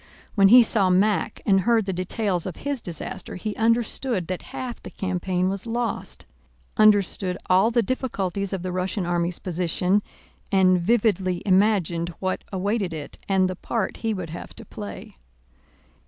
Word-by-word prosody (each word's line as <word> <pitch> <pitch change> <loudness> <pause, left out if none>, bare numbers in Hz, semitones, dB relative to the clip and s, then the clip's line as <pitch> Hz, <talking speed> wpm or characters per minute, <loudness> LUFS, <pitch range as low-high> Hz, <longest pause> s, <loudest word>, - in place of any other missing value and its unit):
When 195 -2 +5
he 245 +4 +9
saw 205 -4 +2
Mack 200 +3 +1
and 195 -2 +4
heard 225 +1 +2
the 190 - -2
details 185 0 -1
of 180 - -5
his 280 -3 -3
disaster 170 -3 -6
he 210 +3 -4
understood 230 -2 +1
that 185 +1 -4
half 250 -2 -6
the - - -8
campaign 185 -1 -1
was 195 +4 -3
lost, 235 0 -3 0.5
understood 200 -4 +3
all 190 +4 +5
the 235 0 +2
difficulties 200 -6 -2
of 190 -3 -3
the 185 - -3
Russian 185 +1 -2
army's 175 0 0
position, 180 +2 0 0.5
and 185 -2 +4
vividly 195 -3 +1
imagined 185 -4 +2
what 185 -1 -2
awaited 195 -2 -1
it 150 -2 -8
and 190 -1 +3
the 185 - -4
part 215 +2 -3
he 225 - -1
would 185 -6 -4
have 170 - -8
to - - -10
play. - - -8
190 Hz, 155 wpm, -24 LUFS, 180-215 Hz, 0.5 s, he